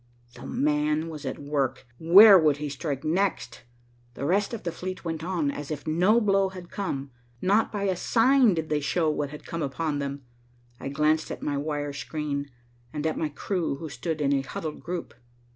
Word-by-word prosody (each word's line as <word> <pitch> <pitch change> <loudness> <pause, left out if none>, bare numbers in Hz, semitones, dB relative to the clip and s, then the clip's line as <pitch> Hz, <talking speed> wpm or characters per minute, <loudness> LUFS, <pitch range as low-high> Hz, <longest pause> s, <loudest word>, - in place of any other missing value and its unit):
"The - - -10
man" 150 +2 0
was 150 -3 -7
at 130 - -4
work. 145 -2 -2
Where 195 +6 +9
would 155 -5 +4
he 150 0 -4
strike 140 0 -4
next? 165 -8 -1 0.5
The 140 - -4
rest 200 +6 +1
of 230 - -6
the 170 - -2
fleet 185 +2 -6
went 160 -1 -3
on, 170 -5 0
as 145 0 -7
if 150 -2 -5
no 180 +9 +3
blow 195 -3 +2
had 180 -2 -11
come. 140 -9 -4 0.3
Not 205 - +2
by 205 -2 -3
a 190 -2 +1
sign 240 +2 +4
did 160 -1 -3
they 150 -1 +1
show 155 +2 +1
what 145 -2 -2
had 150 +1 -10
come 165 - -4
upon 145 +1 -2
them. 140 0 -4 0.6
I - - -5
glanced 155 +2 +1
at - - -6
my 145 - -1
wire 145 0 -2
screen, 145 0 -4 0.4
and 150 0 -4
at 160 - 0
my 155 - -1
crew 165 0 -2
who 160 +3 -7
stood 150 +4 -4
in 140 -1 +2
a 135 - +2
huddled 150 +3 -6
group. 175 -1 -5
155 Hz, 195 wpm, -26 LUFS, 145-180 Hz, 0.6 s, Where